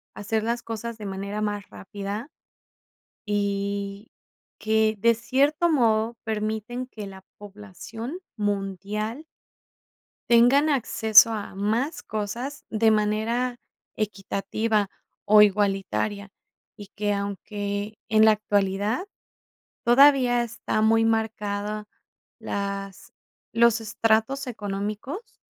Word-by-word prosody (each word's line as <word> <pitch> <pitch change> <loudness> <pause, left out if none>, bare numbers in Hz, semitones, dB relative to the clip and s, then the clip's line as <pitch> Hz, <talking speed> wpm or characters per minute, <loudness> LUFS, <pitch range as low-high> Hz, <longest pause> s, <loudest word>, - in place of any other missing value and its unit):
hacer 215 +1 -2
las 235 +1 -2
cosas 230 0 -5
de 210 - -8
manera 200 +2 -4
más 205 -2 -3
rápida, 205 +6 -6 0.9
y 200 0 -2 0.5
que, 220 0 +2
de 230 +2 +5
cierto 280 +8 +2
modo, 230 -5 +2
permiten 220 +3 -3
que 215 -4 -8
la 190 -1 -11
población 210 - -8 0.2
mundial 205 - -3 1.1
tengan 255 +6 +5
acceso 225 -4 +5
a 205 -3 -6
más 225 - -1
cosas 235 +7 -5
de 220 0 +3
manera 220 +4 0 0.4
equitativa 210 +1 -1 0.4
o 210 0 +8
igualitaria, 200 0 0 0.5
y 205 -2 -10
que, 205 0 0
aunque 205 +1 -4
en 220 0 +5
la 220 - +7
actualidad 205 - 0 0.8
todavía 250 -1 +5
está 235 -2 -2
muy 225 +1 +4
marcada 210 -2 -1 0.5
las 200 -1 -5 0.4
los 235 -1 +4
estratos 225 +5 +1
económicos, 215 - -5
215 Hz, 95 wpm, -25 LUFS, 205-235 Hz, 1.1 s, o